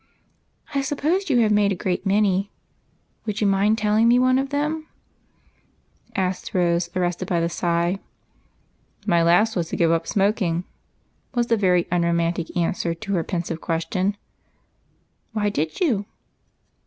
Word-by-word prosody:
" - - -25
I 280 - +1
suppose 310 +7 -1
you 245 -4 +4
have 215 -2 +3
made 205 -1 +3
a - - 0
great 185 +2 -2
many? 200 -1 +2 0.8
Would 210 -1 -2
you 210 - +1
mind 200 +2 +3
telling 215 +1 +3
me 240 +1 +5
one 255 +1 +4
of 270 0 -2
them? 305 +2 -2 0.7
" - - -37
asked 185 0 -2
Rose, 170 -1 +1
ar 185 - +1
rested 175 +1 -2
by 175 - +1
the 165 0 0
sigh. 170 +2 0 1.1
"My 170 -1 +3
last 175 +7 +3
was 170 -3 -1
to - - -3
give 165 -1 +3
up 165 0 0
smoking," 195 -4 +1 0.7
was 240 -1 +2
the - - +6
very 180 -4 +2
unromantic 170 0 0
answer 170 0 0
to 200 +4 -5
her 170 -3 +1
pensive 170 -1 -3
question. 185 +4 -1 1.2
"Why 210 -1 +1
did 160 -5 -2
you?" 225 - +1
195 Hz, 155 wpm, -23 LUFS, 170-215 Hz, 1.2 s, the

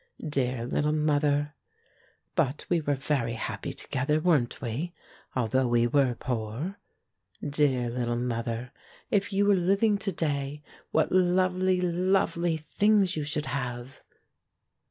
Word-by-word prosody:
Dear 125 -5 0
little 150 +4 0
mother! 145 -1 +1 0.8
But 150 -4 0
we 175 -2 +2
were 145 -1 0
very 135 -4 -1
happy 115 - -4
to - - -6
gether, 140 +4 +1
weren't 155 -8 +2
we, 140 +9 -4 0.4
although 130 +1 +1
we 120 0 +3
were 130 0 +2
poor? 120 - -4 0.7
Dear 140 -4 +2
little 120 -1 -1
mother, 120 0 -3 0.4
if 205 0 +1
you 200 +1 +2
were 205 - +5
living 200 +3 +2
to 195 - -2
day, 145 -3 -2 0.3
what 160 - +1
lovely, 185 0 +3
lovely 175 -2 +1
things 200 +4 +2
you 155 - -2
should 150 +1 -2
have 125 -1 -4
145 Hz, 130 wpm, -28 LUFS, 125-175 Hz, 0.8 s, were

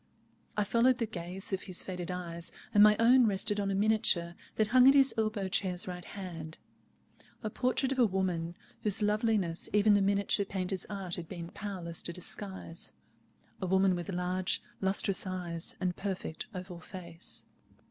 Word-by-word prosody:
I 210 - +3
followed 235 +4 +3
the 230 - 0
gaze 185 -1 -4
of 190 - 0
his 185 -2 -2
faded 180 -2 -5
eyes, 170 -2 -3 0.2
and 205 - +6
my 210 0 +8
own 240 +1 +6
rested 205 +1 +1
on 200 -1 0
a 195 - 0
miniature 195 -5 +2 0.2
that 215 -1 +1
hung 255 +2 +7
at 270 - +8
his 270 -1 +6
elbow 215 -3 0
chair's 190 -3 -1
right 180 -1 -5
hand, 165 -5 -7 0.9
a 215 - -2
portrait 255 +3 +1
of 265 - -1
a 240 - +6
woman, 180 -3 -1 0.3
whose 210 0 +2
loveliness 210 -5 +1
even 210 0 +5
the 205 - +4
miniature 200 +1 +2
painter's 190 -1 -3
art 195 -4 -4
had 170 -2 -7
been 170 -2 -6
powerless 180 -5 -5
to 170 - -5
disguise—a 185 0 -8
woman 190 +1 +4
with 175 +2 -5
large 180 0 0 0.2
lustrous 190 0 +3
eyes 175 -3 -4
and 180 -2 -1
perfect 190 -5 -4
oval 180 -3 -7
face. 175 -2 -8
190 Hz, 165 wpm, -31 LUFS, 180-210 Hz, 0.9 s, my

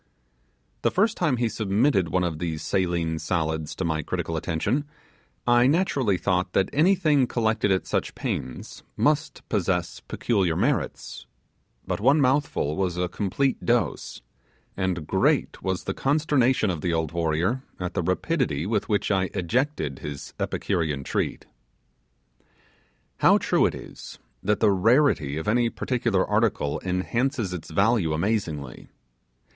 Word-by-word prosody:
The - - +3
first 210 +4 +2
time 150 -8 +1
he 120 0 +1
submitted 105 - +1
one 90 +2 +1
of 80 -3 -2
these 80 -2 -3
saline 85 -2 0
salads 80 -3 -2
to 95 - -3
my 80 -2 0
critical 80 +2 -3
attention 90 - -1 0.6
I 120 +1 +5
naturally 140 - +2
thought 90 0 0
that 95 - +1
anything 155 -4 +3
collected 110 -4 +1
at 95 - +1
such - - -2
pains 65 - -5 0.2
must 150 +1 0
possess 90 -4 -1
peculiar 95 -8 0
merits; 125 - -2 0.6
but - - -2
one 135 +8 +4
mouthful 135 - +1
was 90 -2 -1
a 90 0 0
complete 105 +9 -1
dose; 120 0 -1 0.5
and 95 -4 -2
great - - +1
was 95 -1 -2
the 95 - -3
consternation 135 -6 +2
of 80 -4 -4
the 85 0 0
old 80 -2 -1
warrior 85 +8 0 0.2
at 90 -1 -3
the 90 - 0
rapidity 90 - 0
with 105 0 -1
which 105 0 +1
I 95 -1 +1
ejected 95 - -1
his 75 -2 -7
Epicurean 75 -5 -1
treat. - - -2 1.7
How - - +6
true - - +2
it - - -4
is, - - -10 0.2
that 105 +1 0
the 110 -2 +5
rarity 100 - +3
of 80 - -5
any 120 +2 +3
particular 120 -6 0
article 105 -9 0
enhances 110 +4 -1
its 90 - -7
value 100 -1 +2
amazingly. 80 - -2
95 Hz, 140 wpm, -25 LUFS, 85-125 Hz, 1.7 s, How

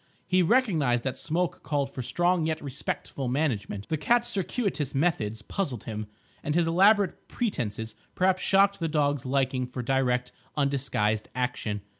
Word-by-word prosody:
He 185 0 +3
recognised 165 - +2
that 130 - -3
Smoke 170 +2 -1
called 140 -2 -1
for 130 - -4
strong 175 +5 +1
yet 160 -1 -1
respectful 140 -1 -4
management. 120 -7 -1
The 160 - -1
cat's 240 +9 +2
circuitous 190 - -1
methods 115 -9 0
puzzled 135 - -3
him, 110 -1 -5 0.3
and 150 - -2
his 170 -1 +3
elaborate 195 +3 +3
pretences 110 - -3 0.2
perhaps 185 0 +2
shocked 200 0 +4
the 165 - 0
dog's 145 -4 0
liking 130 -1 0
for 125 0 -5
direct, 125 -1 +1 0.3
undisguised 130 -7 0
action. 125 -5 -2
145 Hz, 145 wpm, -27 LUFS, 125-180 Hz, 0.3 s, shocked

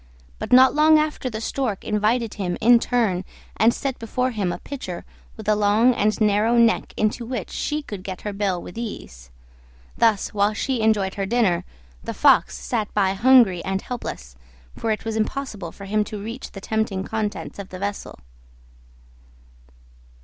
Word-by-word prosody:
But 220 - -5
not 260 +1 +7
long 310 +1 +6
after 305 -4 -1
the 220 -2 -5
Stork 225 -3 -2
invited 215 +2 0
him 180 -3 -3
in 235 +2 +6
turn, 220 -8 0 0.3
and 220 +3 +4
set 265 +1 -4
before 250 +3 -1
him 200 -6 -1
a - - -4
pitcher 190 -11 -7 0.3
with 220 -1 -9
a 215 - +4
long 210 +4 +4
and 215 -1 0
narrow 215 +2 +3
neck, 230 -1 +3
into 215 +3 0
which 235 -5 -5
she 300 0 -2
could 205 -8 -7
get 185 -1 -7
her 210 - -4
bill 195 -3 -1
with 180 +5 -9
ease. 60 - -7 0.7
Thus, 220 -4 +2
while 205 +1 +1
she 255 +1 -1
enjoyed 205 -3 +2
her 195 -1 -3
dinner, 210 -6 +1 0.4
the - - -5
Fox - - +4
sat 220 -4 -3
by 195 -2 +2
hungry 230 -5 +5
and 190 0 -2
helpless, 65 - -6 0.4
for 225 - -3
it 215 0 -1
was 225 -1 -2
impossible 215 -5 -3
for 200 - -11
him 210 +2 +1
to 210 - -6
reach 230 +6 -7
the 195 - -8
tempting 220 -3 -1
contents 210 -1 -4
of 195 -1 -7
the 185 - -8
vessel. 200 +2 -5
215 Hz, 170 wpm, -23 LUFS, 195-235 Hz, 0.7 s, not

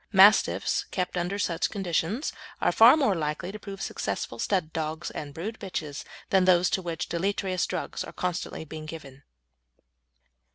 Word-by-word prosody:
Mastiffs 200 +1 +5
kept 185 -1 -3
under 180 +3 -1
such 175 -4 0
conditions 195 - -1 0.3
are - - +3
far 235 +7 +8
more 270 -10 +3
likely 155 +2 -2
to 215 - -8
prove 195 -2 -7
successful 100 +3 -3
stud 180 - 0
dogs 160 +1 -3
and 145 -1 -6
brood 200 +10 -6
bitches 155 -7 -5 0.3
than 190 -1 +5
those 180 -1 +4
to 190 - +1
which 170 -3 -4
deleterious 185 +1 -1
drugs - - -3
are - - -8
constantly 180 -2 -3
being 155 0 -8
given. 140 -4 -9
180 Hz, 155 wpm, -27 LUFS, 160-195 Hz, 0.3 s, far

